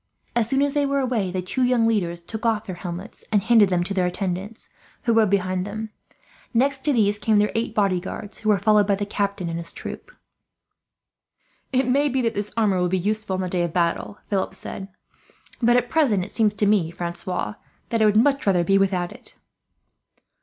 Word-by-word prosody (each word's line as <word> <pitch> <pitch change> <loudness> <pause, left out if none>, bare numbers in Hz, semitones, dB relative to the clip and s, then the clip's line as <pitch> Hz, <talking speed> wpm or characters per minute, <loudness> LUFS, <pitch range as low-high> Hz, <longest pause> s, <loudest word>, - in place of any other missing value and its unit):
As 230 -2 +1
soon 270 +2 +2
as 285 -1 0
they 290 - +2
were 280 0 0
away, 240 -8 0
the 185 0 -3
two 225 +8 -2
young 250 -2 +3
leaders 175 -6 -1
took 220 +5 -6
off 225 -2 +1
their 185 - -5
helmets 175 +2 -6
and 205 -3 +3
handed 225 -3 +5
them 180 -1 +1
to 195 - -4
their 185 -2 +1
attendants, 190 +3 -4 0.3
who 235 - +2
rode 220 -3 +4
behind 185 -2 0
them. 215 +2 -6 0.6
Next 270 +3 +2
to 300 - +3
these 205 -5 +2
came 215 0 +2
their 210 0 +3
eight 225 -1 -2
bodyguards, 200 +1 -1
who 215 - -1
were 210 - +5
followed 210 +1 +3
by 200 - +3
the 205 +1 -3
captain 200 -3 -2
and 165 0 -3
his 165 0 -2
troop. - - -8 1.6
"It 260 -1 +1
may 280 +3 +3
be 265 0 0
that 230 - +1
this 205 +1 -3
armour 205 -5 +2
will 180 - +1
be 190 - +1
useful, 210 +1 -1
on 185 - -2
the 185 - -2
day 180 0 -1
of 170 -2 -2
battle," 175 +3 -1
Philip 195 -2 -1
said; 190 - -6 0.7
"but 240 +1 +5
at 245 0 +1
present 245 - +2
it 195 - -8
seems 215 -2 +2
to 210 - +1
me, 200 -5 +3
Francois, 175 +3 -4 0.4
that 230 -1 0
I - - +5
would 210 0 +4
much 275 +1 +3
rather 180 -3 +3
be 195 +3 +3
without 185 -3 0
it." - - -11
205 Hz, 210 wpm, -23 LUFS, 185-230 Hz, 1.6 s, handed